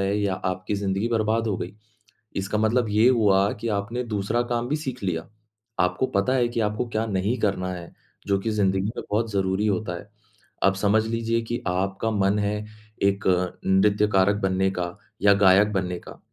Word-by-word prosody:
है 100 Hz, +1 st, 0 dB
या 100 Hz, -2 st, 0 dB
आपकी 95 Hz, +2 st, -3 dB
ज़िंदगी 100 Hz, +2 st, -1 dB
बर्बाद 115 Hz, 0 st, +1 dB
हो 100 Hz, -, 0 dB
गई। 90 Hz, -, -5 dB, 0.6 s
इसका 100 Hz, +2 st, -1 dB
मतलब 110 Hz, +1 st, +2 dB
ये 110 Hz, +4 st, +4 dB
हुआ 100 Hz, -4 st, +3 dB
कि 115 Hz, -, -2 dB
आपने 115 Hz, +5 st, -3 dB
दूसरा 110 Hz, +1 st, -1 dB
काम 120 Hz, 0 st, 0 dB
भी 150 Hz, -, +1 dB
सीख 130 Hz, -7 st, -5 dB
लिया, 80 Hz, -3 st, -2 dB, 0.5 s
आपको 90 Hz, +7 st, +2 dB
पता 100 Hz, +7 st, +2 dB
है 125 Hz, -2 st, +2 dB
कि 120 Hz, -1 st, -3 dB
आपको 105 Hz, +3 st, -1 dB
क्या 110 Hz, 0 st, -1 dB
नहीं 105 Hz, +4 st, -1 dB
करना 95 Hz, -3 st, 0 dB
है, 85 Hz, -1 st, -9 dB, 0.3 s
जो 100 Hz, -1 st, +2 dB
कि 110 Hz, -, -2 dB
ज़िंदगी 95 Hz, -2 st, +1 dB
में -, -, -5 dB
बहुत 110 Hz, +1 st, 0 dB
ज़रूरी 95 Hz, +1 st, 0 dB
होता 95 Hz, -2 st, -1 dB
है। 105 Hz, -, -14 dB, 0.5 s
अब 95 Hz, 0 st, +4 dB
समझ 105 Hz, +2 st, +2 dB
लीजिए 115 Hz, 0 st, 0 dB
कि 120 Hz, +1 st, -4 dB
आपका 95 Hz, +4 st, -1 dB
मन 100 Hz, 0 st, +2 dB
है 105 Hz, 0 st, 0 dB, 0.5 s
एक 100 Hz, 0 st, +1 dB, 0.4 s
नृत्यकारक 100 Hz, 0 st, +3 dB
बनने 95 Hz, 0 st, +1 dB
का 90 Hz, 0 st, -4 dB, 0.3 s
या 100 Hz, 0 st, +7 dB
गायक 100 Hz, +1 st, +5 dB
बनने 90 Hz, -2 st, -1 dB
का, -, -, -12 dB
100 Hz, 185 wpm, -24 LUFS, 95-110 Hz, 0.6 s, या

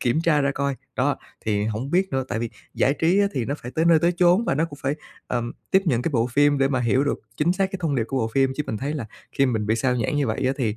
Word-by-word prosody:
kiểm 125 Hz, +6 st, +1 dB
tra 165 Hz, -3 st, +3 dB
ra 140 Hz, 0 st, +2 dB
coi. 140 Hz, 0 st, -2 dB, 0.2 s
Đó, -, -, +1 dB, 0.3 s
thì 105 Hz, -1 st, 0 dB
hổng 110 Hz, +5 st, -3 dB
biết 185 Hz, +3 st, +2 dB
nữa, 135 Hz, 0 st, 0 dB
tại 115 Hz, -, -2 dB
vì 115 Hz, 0 st, -3 dB, 0.2 s
giải 135 Hz, -, +2 dB
trí 165 Hz, +6 st, +2 dB
á 200 Hz, -, +4 dB
thì 130 Hz, -5 st, -1 dB
nó 140 Hz, -, -2 dB
phải 120 Hz, -, -8 dB
tới 160 Hz, +5 st, 0 dB
nơi 165 Hz, -1 st, +6 dB
tới 170 Hz, +3 st, +2 dB
chốn 180 Hz, +5 st, +4 dB
và -, -, +1 dB
nó 155 Hz, +4 st, +1 dB
cũng 145 Hz, -4 st, -9 dB
phải, 135 Hz, +2 st, 0 dB, 0.3 s
ờm, 120 Hz, -1 st, -2 dB, 0.2 s
tiếp 190 Hz, -, +4 dB
nhận 125 Hz, -7 st, +2 dB
cái 160 Hz, -, -1 dB
bộ 115 Hz, -3 st, +2 dB
phim 145 Hz, +3 st, +3 dB
để 135 Hz, 0 st, +3 dB
mà 130 Hz, -2 st, 0 dB
hiểu 125 Hz, +3 st, +2 dB
được 145 Hz, -, -1 dB, 0.2 s
chính 165 Hz, +4 st, +2 dB
xác 195 Hz, +1 st, +1 dB
cái 195 Hz, -, -3 dB
thông 155 Hz, -4 st, 0 dB
điệp 120 Hz, -4 st, +1 dB
của 135 Hz, -, -3 dB
bộ 115 Hz, -2 st, 0 dB
phim 135 Hz, -1 st, +3 dB
chứ 150 Hz, -, 0 dB
mình 110 Hz, -, -3 dB
thấy 145 Hz, +2 st, -2 dB
là 130 Hz, -7 st, -4 dB, 0.3 s
khi 135 Hz, -, +2 dB
mình 110 Hz, -4 st, -1 dB
bị 110 Hz, +1 st, +2 dB
sao 125 Hz, +2 st, +1 dB
nhãng 120 Hz, +5 st, -1 dB
như 145 Hz, -2 st, +1 dB
vậy 110 Hz, +3 st, -2 dB
á 130 Hz, -, +2 dB
thì 115 Hz, -6 st, -1 dB
135 Hz, 310 wpm, -24 LUFS, 120-155 Hz, 0.3 s, nơi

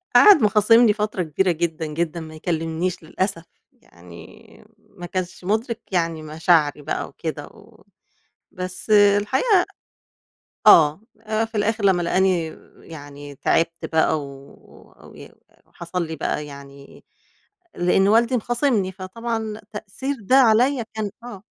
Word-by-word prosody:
قَعَد 405 Hz, -, +8 dB
مخاصمني 215 Hz, +2 st, +5 dB
فترة 210 Hz, -3 st, -2 dB
كبيرة 175 Hz, +4 st, 0 dB
جدًا 165 Hz, -1 st, -3 dB
جدًا 165 Hz, +2 st, -3 dB
ما 155 Hz, -1 st, -10 dB
يكلمنيش 165 Hz, +2 st, -3 dB
للأسف، 185 Hz, +1 st, -3 dB, 0.3 s
يعني 85 Hz, 0 st, -16 dB, 0.2 s
ما 175 Hz, -, -12 dB
كانش 185 Hz, 0 st, -5 dB
مُدرك 225 Hz, +4 st, -2 dB
يعني 165 Hz, -3 st, -1 dB
مشاعري 155 Hz, -1 st, +1 dB
بقى -, -, -4 dB
وكده -, -, -6 dB
و -, -, -20 dB, 0.7 s
بس 185 Hz, +3 st, -7 dB
الحقيقة 210 Hz, -, +4 dB, 1.0 s
آه 155 Hz, +3 st, +6 dB, 0.2 s
آآ 220 Hz, 0 st, -1 dB
في 225 Hz, 0 st, -12 dB
الآخر 215 Hz, 0 st, -1 dB
لمّا 185 Hz, -3 st, +3 dB
لقاني 180 Hz, -1 st, +1 dB, 0.3 s
يعني 145 Hz, -2 st, -11 dB
تعبت 165 Hz, +4 st, 0 dB
بقى 160 Hz, -1 st, +2 dB
و 140 Hz, 0 st, -9 dB, 0.7 s
و -, -, -15 dB, 0.6 s
حصل 170 Hz, 0 st, -4 dB
لي 160 Hz, 0 st, -6 dB
بقى 150 Hz, +1 st, -3 dB
يعني 140 Hz, -1 st, -13 dB, 0.7 s
لأنّه 190 Hz, +3 st, +2 dB
والدي 235 Hz, +3 st, +3 dB
مخاصمني 235 Hz, -5 st, 0 dB
فطبعًا 220 Hz, +3 st, -5 dB
تأثير 240 Hz, +7 st, -5 dB
ده 255 Hz, +7 st, +2 dB
عليَّ 245 Hz, +1 st, +4 dB
كان 215 Hz, -2 st, -3 dB
آه 205 Hz, -5 st, -9 dB
185 Hz, 120 wpm, -22 LUFS, 160-220 Hz, 1.0 s, قَعَد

